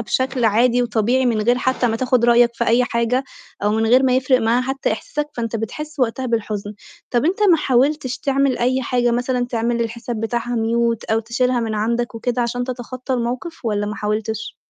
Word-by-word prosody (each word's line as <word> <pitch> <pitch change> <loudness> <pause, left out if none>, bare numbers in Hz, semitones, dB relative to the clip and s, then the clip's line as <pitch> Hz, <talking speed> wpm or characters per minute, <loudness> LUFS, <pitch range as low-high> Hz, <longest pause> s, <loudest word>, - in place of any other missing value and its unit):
بشكل 260 +4 -1
عادي 235 +3 +3
وطبيعي 240 +3 +1
من 225 -3 +1
غير 240 +3 +2
حتى 260 0 0
ما 225 -1 0
تاخُد 250 0 +1
رأيك 240 0 +5
في 235 - -1
أي 240 +2 +4
حاجة، 235 +2 0 0.4
أو 205 - +2
من 220 +1 +1
غير 250 +4 +5
ما 255 -1 +3
يفرق 260 0 +3
معاها 230 +2 +2
حتى 265 -1 -1
إحساسك، 295 +6 -4
فأنت 230 -1 -2
بتحس 300 +8 -6
وقتها 255 +1 0
بالحُزن. 210 -3 -3 0.4
طَب 240 +1 +1
أنت 355 +5 +1
ما 340 - +6
حاولتش 270 -1 +1
تعمل 275 -2 +1
أي 255 +2 +1
حاجة 245 -1 +1
مثلًا 245 +1 0
تعمل 235 0 -1
للحساب 235 0 -3
بتاعها 235 +1 -2
mute 230 0 0
أو 225 - +3
تشيلها 240 +2 0
من 225 -2 -2
عندك 235 +3 -1
وكده، 245 +1 -1
عشان 245 +1 -2
تتخطّى 255 +1 -5
الموقِف 250 +7 -4
والَّا 205 -2 -1
ما 210 - -4
حاولتش؟ 215 +1 -3
240 Hz, 190 wpm, -20 LUFS, 225-255 Hz, 0.4 s, ما